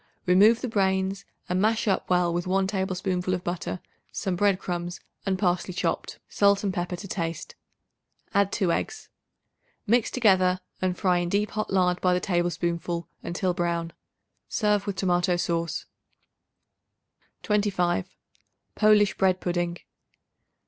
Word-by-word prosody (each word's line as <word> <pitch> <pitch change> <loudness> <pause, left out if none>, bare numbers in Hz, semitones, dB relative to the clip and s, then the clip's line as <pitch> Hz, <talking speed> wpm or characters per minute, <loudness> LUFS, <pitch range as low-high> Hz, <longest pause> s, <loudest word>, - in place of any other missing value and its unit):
Remove 205 +6 +5
the 255 - -2
brains 190 -2 0 0.2
and 180 0 0
mash 220 +1 +1
up 195 - 0
well 180 -1 +2
with 175 +1 -2
1 190 +1 +2
tablespoonful 185 -2 -1
of 180 - -6
butter, 175 +1 -3 0.3
some 190 -2 -2
bread 200 +1 +3
crumbs 175 -1 -4 0.3
and 190 -1 +1
parsley 180 -1 0
chopped, - - -2
salt 200 0 +3
and 195 -2 0
pepper 175 0 -2
to 200 +3 -8
taste; 165 -3 -4 0.8
add 200 -1 +3
2 190 -5 +1
eggs. 435 - -3 0.8
Mix 235 +2 +3
together 185 -6 +3 0.2
and 185 -1 0
fry 180 -3 +2
in 175 0 -2
deep 205 +3 0
hot 215 0 -3
lard 180 -2 +2
by 180 -1 +3
the - - +1
tablespoonful 175 -1 -1
until 180 +1 -1
brown. 170 -1 -2 0.6
Serve 210 -2 +1
with 200 - -2
tomato 180 -1 +1
sauce. 170 -1 -2 1.6
25. 195 - +1 0.6
Polish 210 -2 +4
Bread 185 -1 +3
Pudding. 175 -1 -1
185 Hz, 135 wpm, -26 LUFS, 175-200 Hz, 1.6 s, Remove